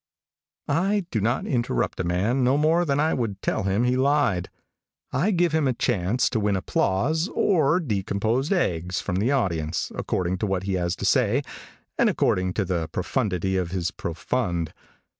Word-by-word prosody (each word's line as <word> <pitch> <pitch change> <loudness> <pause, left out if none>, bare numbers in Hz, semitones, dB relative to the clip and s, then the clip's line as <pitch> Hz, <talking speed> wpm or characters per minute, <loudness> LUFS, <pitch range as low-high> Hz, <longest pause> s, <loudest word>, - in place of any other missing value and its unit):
I 190 +6 +1
do 110 - 0
not 120 +5 0
interrupt 120 - -1
a - - 0
man 100 +10 +1
no 130 +3 +3
more 160 +4 +3
than 140 -2 +1
I 155 +2 +2
would 110 -6 -2
tell - - 0
him 100 +4 +1
he 125 +1 +2
lied. 130 -9 +1 0.6
I 155 +11 +1
give 175 -4 +2
him 155 -3 +2
a 130 - +2
chance 115 -1 +1
to 115 - 0
win 105 -1 +1
applause 125 - 0
or 165 -3 +3
decomposed 110 - -1
eggs 90 - 0
from 90 -2 -2
the 110 +7 +1
audience, 85 - -1
according 90 0 -2
to 105 - -1
what 95 -1 -1
he 95 0 -2
has 90 -1 0
to 100 - -5
say, 125 +5 +2 0.6
and - - +5
according 90 0 +1
to 105 - -1
the 85 -3 -1
profundity 95 - -1
of 90 -2 -1
his 85 -2 -2
profund. 85 0 -2
105 Hz, 175 wpm, -25 LUFS, 90-140 Hz, 0.6 s, and